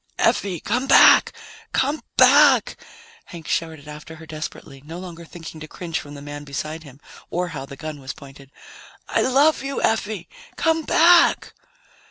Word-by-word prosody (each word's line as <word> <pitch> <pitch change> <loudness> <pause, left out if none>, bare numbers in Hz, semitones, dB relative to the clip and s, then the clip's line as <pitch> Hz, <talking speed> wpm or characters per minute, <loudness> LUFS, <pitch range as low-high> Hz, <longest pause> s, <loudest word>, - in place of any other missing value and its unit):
"Effie, 185 -4 0
come 250 - -2
back! - - +6 0.4
Come 285 +4 0 0.2
back!" 265 -2 +5 0.5
Hank 170 -3 -11
shouted 160 -3 -3
after 150 +2 -10
her 160 0 -13
desperately, 155 -3 -8
no 160 +3 -9
longer 175 -2 -9
thinking 165 -1 -11
to 155 - -9
cringe 165 0 -5
from 145 0 -11
the 140 - -10
man 145 0 -8
beside 155 +3 -6
him, 140 -3 -15 0.3
or 180 +1 -2
how 135 -4 -7
the 140 - -11
gun 155 -1 -7
was 135 -1 -7
pointed. 135 -1 -14 0.6
"I - - 0
love 280 +5 +3
you, 275 +1 -4
Effie. 215 -4 -1 0.3
Come 325 0 +1
back!" 340 +1 +4
165 Hz, 160 wpm, -22 LUFS, -, 0.6 s, back